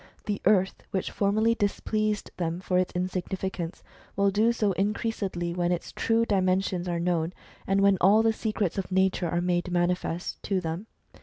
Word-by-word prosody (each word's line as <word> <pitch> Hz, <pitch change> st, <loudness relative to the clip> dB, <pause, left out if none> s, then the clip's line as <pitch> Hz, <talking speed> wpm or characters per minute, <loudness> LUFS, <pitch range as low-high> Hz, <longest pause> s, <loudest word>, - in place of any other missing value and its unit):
The 205 Hz, -1 st, -2 dB
earth, 190 Hz, -1 st, +3 dB
which 190 Hz, -, -2 dB
formerly 215 Hz, +3 st, +2 dB
displeased 215 Hz, 0 st, -1 dB
them 170 Hz, -1 st, -2 dB
for 180 Hz, -1 st, +1 dB
its 185 Hz, -, 0 dB
insignificance, 185 Hz, -1 st, -3 dB, 0.3 s
will 200 Hz, 0 st, +3 dB
do 215 Hz, +4 st, +3 dB
so 215 Hz, -3 st, +1 dB
increasedly 195 Hz, -3 st, -2 dB
when 175 Hz, 0 st, +1 dB
its 175 Hz, -, -2 dB
true 230 Hz, 0 st, +1 dB
dimensions 185 Hz, -3 st, +1 dB
are 170 Hz, -1 st, -1 dB
known, 170 Hz, -1 st, 0 dB, 0.3 s
and 195 Hz, +1 st, +2 dB
when 200 Hz, -2 st, +4 dB
all 205 Hz, +4 st, +6 dB
the 225 Hz, 0 st, +3 dB
secrets 215 Hz, -4 st, -1 dB
of 190 Hz, -, -5 dB
nature 190 Hz, -2 st, +2 dB
are 175 Hz, +1 st, 0 dB
made 175 Hz, 0 st, 0 dB
manifest 175 Hz, -1 st, -1 dB
to 195 Hz, -2 st, 0 dB
them. 170 Hz, +4 st, -4 dB
190 Hz, 165 wpm, -27 LUFS, 175-205 Hz, 0.3 s, all